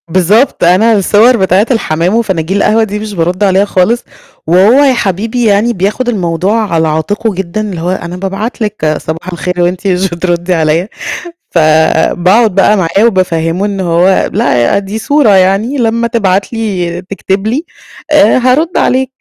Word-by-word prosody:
بالضبط 190 +10 +1
أنا 185 +7 +4
الصوَر 215 +4 +3
بتاعة 190 +1 +2
الحمام 180 -4 0
وفناجين 190 -5 -1
القهوة 220 +2 +2
دي 210 -1 -4
مش 215 -1 -6
بارد 180 +2 -1
عليها 195 0 +2
خالص، 205 +5 0 0.4
وهو 185 +7 +4
يا 270 -2 +3
حبيبي 225 +2 -2
يعني 215 +3 +2
بياخد 205 +6 -2
الموضوع 195 +1 -1
على 160 -1 +1
عاتقه 205 +8 -2
جدًا 190 +2 -4
اللي 195 -6 -5
هو، 175 - -2
"أنا 180 -1 -5
بابعت 195 +6 -5
لِك 210 -5 -3
صباح 160 +3 -6
الخير 180 +1 -3
وأنتِ 180 +3 -1
مش 190 0 0
بتردّي 175 +1 -2
عليَّ."، 160 +2 0 0.6
فباقعُد 170 +6 +2
بقى 200 +2 +3
معاه 190 +3 +1
وبافهّمه 180 -3 0
إن 200 -2 -4
هو، 180 +1 +1
"لأ 185 - +1
دي 200 +2 -5
صورة 285 +2 +2
يعني 195 +8 +1
لمّا 230 -1 0
تبعت 200 -4 -1
لي 185 -6 -3
تكتب 195 +1 -3
لي، 260 +9 -1 0.5
آآ 295 -7 +4
هارُد 260 +7 +1
عليك." 260 +1 0
195 Hz, 155 wpm, -10 LUFS, 175-220 Hz, 0.6 s, أنا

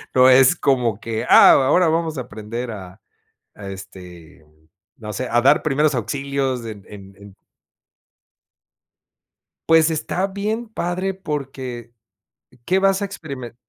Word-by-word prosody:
no 130 0 +6
es, 130 0 +6
como 120 -6 0
que, 115 0 -4
ah, - - +8
ahora 150 +7 +3
vamos 160 -1 -1
a - - -2
aprender 115 +3 -7
a 95 -2 -10 0.5
a, 100 -2 -10
este, 90 -4 -12
mm, 75 +1 -30 0.3
no 105 -2 -7
sé, 120 +6 -4
o - - -5
sea, 120 - -2
a 120 - +4
dar 140 +4 +4
primeros 150 0 +1
auxilios, 135 +1 -3
en 105 -3 -9
en 100 -1 -13
en 100 0 -15 2.4
Pues, 160 0 +5
está 165 +4 -2
bien 210 +4 -4
padre, 185 -1 -3
porque, 135 -8 -6 0.7
qué 190 +1 +2
vas 195 0 +2
a - - 0
experimen 140 - -8
130 Hz, 145 wpm, -20 LUFS, 105-160 Hz, 2.4 s, ah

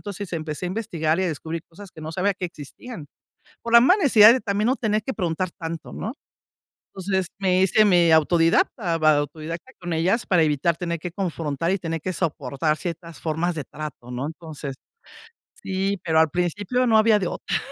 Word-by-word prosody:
entonces 200 -2 -6
empecé 160 +1 -4
a - - -2
investigar 170 -6 -1
y 190 - +1
a - - 0
descubrir 160 +1 -5
cosas 195 +3 -12
que - - -12
no 160 +1 -6
sabía 195 +2 0
que 180 - -5
existían, 170 - -10 0.6
por 235 - -4
la 235 - +10
mala 365 - +4
necesidad 225 -5 +8
de 260 - +1
también 205 +1 0
no 260 - +3
tener 215 -2 0
que 265 - -3
preguntar 180 -1 -1
tanto, 165 -1 -6
¿no? 220 - -4 0.8
Entonces, 190 -1 -1
me 185 -1 +2
hice 195 +3 +4
medio 175 -4 +5
autodidacta, 165 - +2
va, 155 -1 +4
autodidacta 155 - -5
con 175 -1 -4
ellas, 185 +9 +1
para 175 -3 +3
evitar 155 +2 +1
tener 170 -1 -3
que 170 +2 -6
confrontar 165 -4 -2
y 195 - 0
tener 165 -2 -4
que 185 - -2
soportar 150 -2 -1
ciertas 170 0 -6
formas 165 +2 -1
de 150 - -4
trato, 150 -5 -8
¿no? 125 +3 -3
Entonces, 155 -3 -7 0.9
sí, 195 +1 -1
pero 160 -1 +3
al 160 - +3
principio 205 - 0
no 220 - +5
había 215 -1 +5
de 185 - -1
otra. - - -2
175 Hz, 195 wpm, -23 LUFS, 160-200 Hz, 0.9 s, la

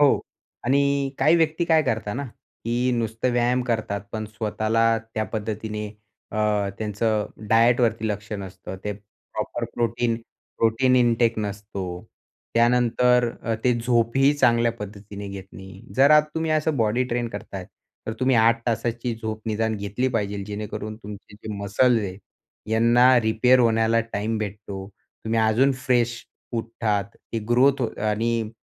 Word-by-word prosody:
हो, 145 -1 +5 0.4
आणि 140 +1 +2
काही 155 +5 +5
व्यक्ती 160 +1 +1
काय 160 -2 +4
करता 110 -6 -2
ना, 140 +3 -3 0.4
की 120 +2 +1
नुसतं 115 +1 -1
व्यायाम 120 +1 +2
करतात 110 -4 -1
पण 110 -1 -3
स्वतःला 110 +2 +1 0.2
त्या 110 0 0
पद्धतीने 105 -1 -3 0.5
अ, 105 -2 +1
त्यांचं 105 0 0 0.2
डायटवरती 115 -1 +3
लक्ष 105 0 -4
नसतं. 95 0 -8
ते 105 - -1
प्रॉपर 105 +3 -6
प्रोटीन 120 0 0 0.4
प्रोटीन 120 +3 +3
इंटेक 115 -2 +3
नसतो. 100 -1 -4 0.7
त्यानंतर 125 +1 +3
अ, 115 - -1
ते 125 - +4
झोपही 120 +4 +3
चांगल्या 120 -4 +3
पद्धतीने 105 -1 -8
घेत 100 -1 -7
नाही. 95 +1 -11
जर 135 +2 +6
अ, 150 0 +8
तुम्ही 160 0 -1
असं 155 -1 +1
बॉडी 115 +1 +2
ट्रेन 120 -1 -2
करताय, 100 -3 -7 0.4
तर 110 - -2
तुम्ही 130 -1 +3
8 115 +1 +4
तासाची 115 +1 -1
झोप 110 -1 -5
निदान 110 0 0
घेतली 105 +6 -1
पाहिजेल, 105 -4 -2
जेणेकरून 105 +1 -5
तुमचे 105 -1 -11
जे 110 +1 -7
मसल्स 105 +4 +2
आहे, 95 -2 -5 0.6
यांना 120 +3 +5
रिपेअर 115 +3 +4
होण्याला 115 -1 +3
टाईम 110 +2 -1
भेटतो. 100 -2 -6 0.4
तुम्ही 115 +1 0
अजून 115 +5 +3
फ्रेश 120 -2 0 0.3
उठतात. 115 -3 -1 0.3
ती 115 - 0
ग्रोथ 130 +3 +4
हो 120 - +1 0.2
आणि 115 +1 -1
115 Hz, 140 wpm, -24 LUFS, 105-125 Hz, 0.7 s, अ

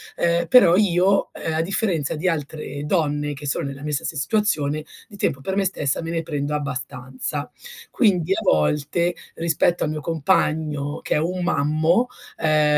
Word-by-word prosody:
ehm, 170 0 +1
però 175 -7 +7
io, 195 -1 +3
ehm, 160 - -4
a 160 - +1
differenza 170 - +1
di 165 +5 -2
altre 150 -3 -4
donne 150 -3 0
che 145 +1 -9
sono 135 - 0
nella 140 0 -7
mia 150 0 -3
stessa 145 +3 -1
situazione, 155 -4 +1 0.2
di 205 - -13
tempo 135 -7 -1
per 190 +6 -3
me 200 - +1
stessa 150 -7 0
me 165 0 -5
ne 165 -1 -1
prendo 150 -2 -3
abbastanza. 135 0 -3 0.4
Quindi 190 - +2
a - - -1
volte, 150 - +1 0.2
rispetto 170 +1 +1
al - - 0
mio 155 0 -4
compagno 150 -1 0
che - - -1
è - - +3
un 180 +3 -1
mammo, 160 - +2 0.3
ehm, 155 -1 +3
155 Hz, 170 wpm, -22 LUFS, 145-175 Hz, 0.4 s, però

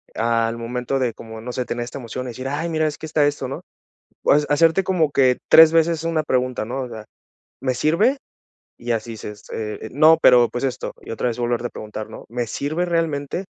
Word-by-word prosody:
al 115 0 0
momento 125 +3 -3
de 125 -3 0
como, 110 0 -10
no 120 +3 -6
sé, 125 0 -3
tener 120 0 -3
esta 120 +3 -7
emoción, 125 +1 -6
y - - -5
decir: 130 +2 -6
''Ay, 145 +5 -2
mira, 155 -1 +1
es 150 - -4
que - - -8
está 155 -1 +2
esto'', 145 -2 -2
¿no? 135 - -6 0.6
O - - +3
hacerte 150 +5 +3
como 180 -5 +1
que 130 -3 +3
3 160 -1 +9
veces 165 0 +2
una 165 -1 0
pregunta, 130 -4 -1
¿no?, 130 +4 -4
o 125 - -7
sea: 110 -2 -9 0.6
''¿Me 130 -1 0
sirve''? 170 - +2 0.6
Y 120 0 -4
así 115 0 -2
dices, 105 -1 -9
eh: 110 0 -5
''No, 155 +4 +6
pero, 120 -2 +6
pues 120 +2 -3
esto'', 130 -1 -3
y - - -9
otra 115 - -2
vez 115 - -4
volverte 120 0 -1
a - - -13
preguntar, 110 0 -7
¿no? 110 - -10
''¿Me 120 +1 -2
sirve 145 +9 -2
realmente?, 165 0 -1
130 Hz, 215 wpm, -21 LUFS, 120-155 Hz, 0.6 s, 3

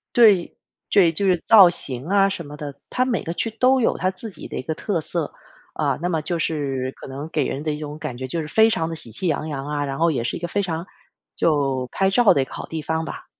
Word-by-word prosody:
对， 210 -7 +5 0.3
对， 185 -5 +5
就 180 +5 -2
是 180 -3 +2
造 200 -6 +9
型 130 -6 -3
啊 195 +1 +4
什 175 -4 -5
么 145 +1 -9
的。 145 -2 -6
它 255 - +1
每 250 -3 -1
个 165 - -3
区 225 - -2
都 255 +4 +3
有 - - +2
它 185 - +1
自 210 +4 -9
己 - - -10
的 - - -6
一 - - -2
个 160 +5 -3
特 185 +1 -1
色。 160 -1 -3 0.4
啊， 140 -4 -1
那 175 - 0
么 160 -3 -1
就 170 +1 -2
是 135 -5 -2
可 - - -11
能 140 +4 -6
给 155 -3 0
人 135 - -3
的 155 0 -1
一 150 - -3
种 150 0 -7
感 125 -5 -5
觉， 130 - -5
就 165 +5 -2
是 155 - -6
非 220 +8 +5
常 165 -7 0
的 165 - -4
喜 140 -8 -5
气 180 - -3
洋 155 -1 -1
洋 140 -3 -4
啊， 145 -1 -1
然 135 -1 -4
后 170 +1 +4
也 130 -7 -1
是 120 - -2
一 - - -5
个 175 - -3
非 200 +4 -1
常 170 -1 -3 0.5
就 135 -5 +1
拍 195 0 +2
照 230 +2 +5
的 140 - +2
一 - - -1
个 - - -20
好 - - -6
地 160 -1 -5
方 160 +1 -2
吧。 - - -8
160 Hz, 295 characters per minute, -22 LUFS, 145-190 Hz, 0.5 s, 造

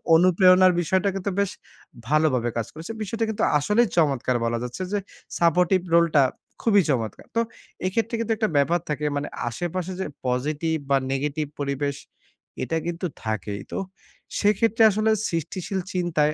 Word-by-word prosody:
অনুপ্রেরণার 185 +1 +6
বিষয়টা 190 +3 +1
কিন্তু 195 +1 -2
বেশ 200 -2 +1 0.6
ভালোভাবে 145 -6 +2
কাজ 115 - -1
করেছে। 160 +7 -7
বিষয়টা 225 +3 -2
কিন্তু 220 - -1 0.2
আসলেই 210 +9 +3
চমৎকার 135 -6 +2
বলা 115 0 0
যাচ্ছে 125 +8 -6
যে 205 - +2 0.4
সাপোর্টিভ 180 +2 +3
রোল 170 0 +6
টা 140 - +7 0.4
খুবই 205 -4 +5
চমৎকার! 115 -6 -2
তো 230 - +3 0.4
এক্ষেত্রে 225 +5 0
কিন্তু 230 0 -1
একটা 215 -3 +1
ব্যাপার 170 +5 +3
থাকে 150 0 -2
মানে 145 - -2 0.2
আশেপাশে 175 +7 -3
যে 190 - -1 0.2
পজিটিভ 150 +6 0
বা 140 - +5
নেগেটিভ 150 +2 -1
পরিবেশ 140 0 -1 0.7
এটা 165 +5 -1
কিন্তু 175 +2 -3 0.2
থাকেই। 105 -2 -3
তো - - -2 0.6
সেক্ষেত্রে 220 +2 +3
আসলে 215 +2 +2 0.2
সৃষ্টিশীল 175 +4 -3
চিন্তায় 155 -4 +1
170 Hz, 145 wpm, -24 LUFS, 140-190 Hz, 0.7 s, টা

